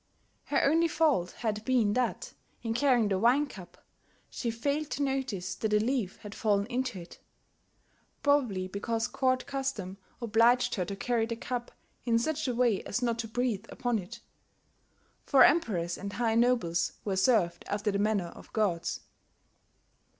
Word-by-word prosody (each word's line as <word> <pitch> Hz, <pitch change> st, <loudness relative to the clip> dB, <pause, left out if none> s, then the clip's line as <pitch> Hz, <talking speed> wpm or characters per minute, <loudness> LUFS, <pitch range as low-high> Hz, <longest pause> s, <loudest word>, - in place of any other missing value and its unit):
Her 280 Hz, -, +1 dB
only 325 Hz, +4 st, +4 dB
fault 305 Hz, -, +2 dB
had 215 Hz, -2 st, -3 dB
been 230 Hz, -4 st, +2 dB
that, 250 Hz, +1 st, -1 dB, 0.3 s
in 225 Hz, -1 st, -1 dB
carrying 240 Hz, -4 st, +3 dB
the 190 Hz, -1 st, +1 dB
wine 250 Hz, +7 st, +4 dB
cup, 195 Hz, -10 st, -12 dB, 0.5 s
she 235 Hz, -, -3 dB
failed 280 Hz, +6 st, -2 dB
to 285 Hz, -, -2 dB
notice 260 Hz, -9 st, -2 dB
that 220 Hz, -1 st, -2 dB
a -, -, +6 dB
leaf 225 Hz, -4 st, -1 dB
had 205 Hz, -1 st, -8 dB
fallen 205 Hz, -3 st, +1 dB
into 250 Hz, -3 st, -2 dB
it, 170 Hz, -, -12 dB, 1.0 s
probably 250 Hz, -11 st, +2 dB
because 225 Hz, +4 st, -2 dB
court 255 Hz, 0 st, 0 dB
custom 265 Hz, -9 st, -4 dB, 0.2 s
obliged 235 Hz, +2 st, +3 dB
her 180 Hz, -, -1 dB
to 200 Hz, -, -5 dB
carry 225 Hz, +2 st, 0 dB
the 230 Hz, -, -3 dB
cup 240 Hz, +1 st, -4 dB, 0.3 s
in 230 Hz, -2 st, +2 dB
such 305 Hz, +5 st, -1 dB
a 250 Hz, -, -1 dB
way 235 Hz, -5 st, +2 dB
as 245 Hz, +5 st, -3 dB
not 235 Hz, -1 st, 0 dB
to 230 Hz, -, -2 dB
breathe 225 Hz, -2 st, -1 dB
upon 245 Hz, -3 st, -1 dB
it; 235 Hz, +6 st, -9 dB, 1.0 s
for 270 Hz, -3 st, +6 dB
emperors 190 Hz, -, +2 dB
and 200 Hz, +1 st, -6 dB
high 235 Hz, -2 st, 0 dB
nobles 230 Hz, -8 st, +2 dB
were 195 Hz, -2 st, 0 dB
served 190 Hz, -4 st, +2 dB
after 205 Hz, +1 st, -1 dB
the 200 Hz, -, -1 dB
manner 205 Hz, -4 st, +1 dB
of -, -, -14 dB
gods. 185 Hz, -6 st, 0 dB
230 Hz, 160 wpm, -29 LUFS, 200-255 Hz, 1.0 s, a